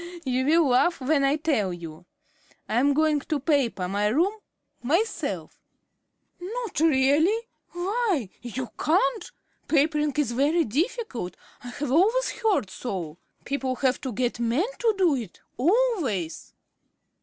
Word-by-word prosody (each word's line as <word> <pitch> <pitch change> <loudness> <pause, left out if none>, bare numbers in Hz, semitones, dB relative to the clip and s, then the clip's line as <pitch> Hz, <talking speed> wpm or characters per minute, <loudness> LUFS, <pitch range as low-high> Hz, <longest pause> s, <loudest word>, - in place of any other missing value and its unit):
"You 260 0 0
will 320 -1 +4
laugh 295 +8 +3
when 280 +2 +1
I 275 +1 +3
tell 285 - 0
you. 170 0 -9 0.6
I'm 275 +5 +2
going 310 -1 +3
to 300 +1 -2
paper 260 - 0
my 205 +2 0
room 330 - +2 0.5
myself." 295 - -2 0.8
"Not 445 +4 -4
really! 320 - +3 0.3
Why, 365 - -1
you 245 +1 -5
can't. 370 +8 +1 0.4
Papering 300 -1 +2
is 285 -6 +1
very 290 +7 +2
difficult; 275 - -2 0.3
I - - -8
have 265 +2 -4
always 435 - +3
heard 430 - 0
so. 180 -8 -5 0.3
People 270 -1 -2
have 260 0 0
to 260 - -4
get 245 +2 -2
men 240 - +1
to 455 -3 +2
do 360 -5 +4
it, 230 -9 -5 0.2
always." 310 - 0
285 Hz, 130 wpm, -25 LUFS, 240-345 Hz, 0.8 s, will